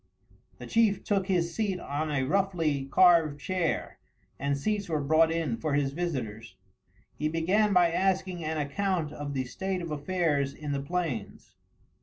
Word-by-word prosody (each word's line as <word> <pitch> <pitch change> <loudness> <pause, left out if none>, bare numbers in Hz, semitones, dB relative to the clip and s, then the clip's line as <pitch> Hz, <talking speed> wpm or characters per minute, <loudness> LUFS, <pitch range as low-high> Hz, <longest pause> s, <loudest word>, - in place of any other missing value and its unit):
The - - -9
chief 225 -3 +2
took 195 -2 0
his 170 -3 +1
seat 200 -3 -1
on 155 +1 -3
a 140 -3 0
roughly 165 -4 0
carved 160 -1 +4
chair, 180 +1 -2 0.4
and 140 +1 0
seats 205 +5 -2
were 155 -2 0
brought 160 +3 +3
in 160 -8 -1
for 145 +4 -1
his 140 -2 +1
visitors. 115 - -4 0.6
He 150 - -2
began 185 +7 +2
by 175 -3 +4
asking 185 -1 0
an 155 +1 -2
account 160 +2 -1
of 145 -1 -5
the 130 - 0
state 190 +9 -3
of 170 -2 -5
affairs 145 -2 0
in 150 -1 -5
the 140 -1 -1
plains. 145 - -4
165 Hz, 160 wpm, -28 LUFS, 140-185 Hz, 0.6 s, carved